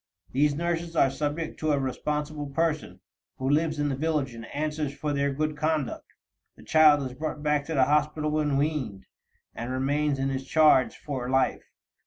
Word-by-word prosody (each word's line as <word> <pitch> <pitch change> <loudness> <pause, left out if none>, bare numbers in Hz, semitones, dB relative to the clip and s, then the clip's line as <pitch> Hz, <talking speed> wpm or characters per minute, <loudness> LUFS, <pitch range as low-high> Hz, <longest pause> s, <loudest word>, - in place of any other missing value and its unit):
These 145 +2 +2
nurses 170 +1 -2
are 135 -4 +4
subject 150 +3 -3
to 155 -1 +1
a 140 - +1
responsible 150 +2 -3
person, 150 - -2 0.4
who 130 - -3
lives 155 +2 +2
in 145 0 0
the 135 - -1
village 150 -3 -1
and 115 0 -9
answers 150 0 -3
for 150 0 -2
their 140 0 +1
good 155 +2 -1
conduct. 155 -2 -2 0.4
The - - -16
child 150 -2 +5
is 130 -1 -5
brought 150 0 -4
back 150 -1 +1
to 160 - -3
the 135 - +5
hospital 150 +2 +1
when 150 -2 +1
weaned, 140 -9 -2 0.5
and 120 +2 -5
remains 140 +2 0
in 135 0 -1
its 135 0 -3
charge 150 -3 +4
for 130 -4 -4
life. 130 0 +1
150 Hz, 180 wpm, -27 LUFS, 135-155 Hz, 0.5 s, child